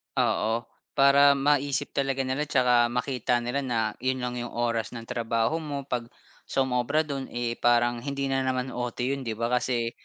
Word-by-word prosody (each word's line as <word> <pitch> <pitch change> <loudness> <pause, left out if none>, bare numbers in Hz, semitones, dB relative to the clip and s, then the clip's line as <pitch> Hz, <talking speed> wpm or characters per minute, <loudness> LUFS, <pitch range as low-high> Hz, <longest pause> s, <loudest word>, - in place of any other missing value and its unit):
Oo, 115 +2 +1 0.3
para 140 +1 +6
maisip 140 0 +1
talaga 135 -1 0
nila 135 +4 -1
tsaka 125 -3 +4
makita 125 0 0
nila 120 +4 -1
na 120 -3 0 0.2
yun 130 +1 0
lang 125 0 -2
yung 120 0 -4
oras 115 -1 0
ng 115 - -6
trabaho 115 +5 0
mo 145 -3 -4
pag 120 -3 -3 0.4
sumobra 130 +3 +1
dun, 140 -3 -4
eh, 120 -1 -2
parang 120 0 +3
hindi 140 +1 -3
na 135 - +2
naman 130 0 -1
OT 125 -1 -4
yun, 135 +2 -1
'di 110 - -2
ba, 115 +2 -2
kasi, 120 -2 0
125 Hz, 175 wpm, -27 LUFS, 120-140 Hz, 0.4 s, para